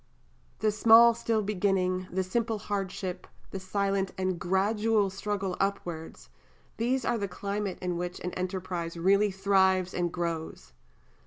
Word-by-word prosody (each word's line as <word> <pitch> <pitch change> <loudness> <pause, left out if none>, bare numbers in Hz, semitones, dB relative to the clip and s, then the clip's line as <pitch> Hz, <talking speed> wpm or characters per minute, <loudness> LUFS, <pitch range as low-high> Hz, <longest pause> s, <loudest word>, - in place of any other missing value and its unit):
The 215 -1 +3
small 225 +2 +7
still 225 -2 -1
beginning, 185 -2 0
the 190 +2 0
simple 225 +4 -1
hardship, 195 -3 -4 0.2
the 195 - -4
silent 195 0 -1
and 185 -2 -1
gradual 205 +3 +1
struggle 195 -1 -3
upwards, 175 -5 -3 0.5
these 250 +2 0
are 235 - 0
the 200 - -2
climate 200 +1 -4
in 180 -1 -1
which 175 +1 -4
an 180 - -3
enterprise 180 -2 -4
really 200 +4 +3
thrives 190 -1 +2
and 175 -1 -1
grows. 165 - -4
190 Hz, 135 wpm, -28 LUFS, 180-210 Hz, 0.5 s, small